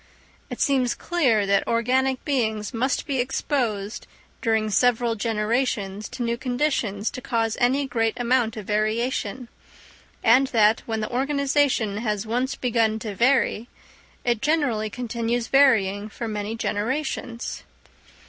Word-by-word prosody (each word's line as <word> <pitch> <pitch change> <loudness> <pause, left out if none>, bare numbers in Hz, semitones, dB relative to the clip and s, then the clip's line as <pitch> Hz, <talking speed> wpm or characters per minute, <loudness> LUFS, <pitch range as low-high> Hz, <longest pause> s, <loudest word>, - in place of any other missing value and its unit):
It - - -6
seems 260 -3 +2
clear 255 -12 +1
that 200 0 +2
organic 255 +3 +1
beings 220 -6 -1
must 255 +4 0
be 275 -3 -1
exposed 240 -5 -2 0.3
during 220 -2 +1
several 240 +1 +2
generations 215 -2 -1
to 245 - -5
new 235 0 -1
conditions 245 -5 -1
to 255 - -7
cause 225 -2 -1
any 265 +4 +3
great 225 -3 0
amount 240 -2 +1
of 210 - -6
variation; 220 +3 -1 0.8
and 255 +4 +5
that, 220 -3 +4
when 220 -1 -2
the 215 - -4
organisation 275 -4 +1
has 210 -2 -2
once 250 +4 -1
begun 225 -3 +1
to 215 -2 -5
vary, 240 0 +2 0.6
it 235 -2 +1
generally 270 -8 +1
continues 235 0 -2
varying 215 -7 +3
for 230 +2 -6
many 210 0 -3
generations. 240 +2 -3
235 Hz, 130 wpm, -24 LUFS, 215-260 Hz, 0.8 s, and